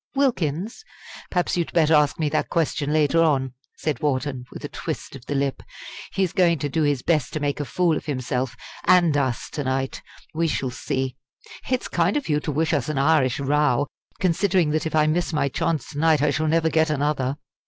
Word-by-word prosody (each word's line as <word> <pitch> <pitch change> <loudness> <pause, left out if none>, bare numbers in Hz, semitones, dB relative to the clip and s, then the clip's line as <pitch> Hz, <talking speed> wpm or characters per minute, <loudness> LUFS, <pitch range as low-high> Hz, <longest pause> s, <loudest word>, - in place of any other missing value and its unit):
Wilkins? 220 - 0 0.5
Perhaps 180 -1 0
you'd 170 -2 -1
better 160 -2 +4
ask 150 -2 +4
me 155 - 0
that 155 - -1
question 150 -3 0
later 155 +1 +3
on!" 135 -5 +2 0.2
said 150 -6 -2
Wharton, 130 -3 -1
with - - -8
a - - -2
twist - - -6
of 130 - -12
the 145 - -2
lip; 140 -1 -1 0.5
"he's 190 -3 0
going 170 -3 +3
to 145 +1 -3
do 160 +3 0
his 145 -4 +1
best 155 -6 +1
to 155 - -1
make 145 -1 -1
a 145 - -2
fool 175 +2 +1
of - - -5
himself 130 -2 -2 0.3
and 175 -4 +5
us 130 -5 0
to 145 - -3
night 130 0 -2 0.3
we 165 +1 +1
shall 135 -4 -1
see! 130 +1 -3 0.5
It's 255 -1 0
kind 175 - +1
of 290 - -4
you 150 -1 +2
to 150 - -3
wish 155 +3 0
us 145 -2 0
an 155 - -2
Irish 140 -3 +3
row! 145 -1 +2 0.3
considering 180 -2 +2
that 155 +1 0
if 160 - -3
I 155 -1 +4
miss 170 +2 0
my 145 -2 +1
chance 160 +3 -2
to 145 - -6
night 155 -2 +3
I 150 - +3
shall 155 0 0
never 160 +1 +2
get 160 -1 +3
another!" 145 -2 0
150 Hz, 205 wpm, -23 LUFS, 140-165 Hz, 0.5 s, and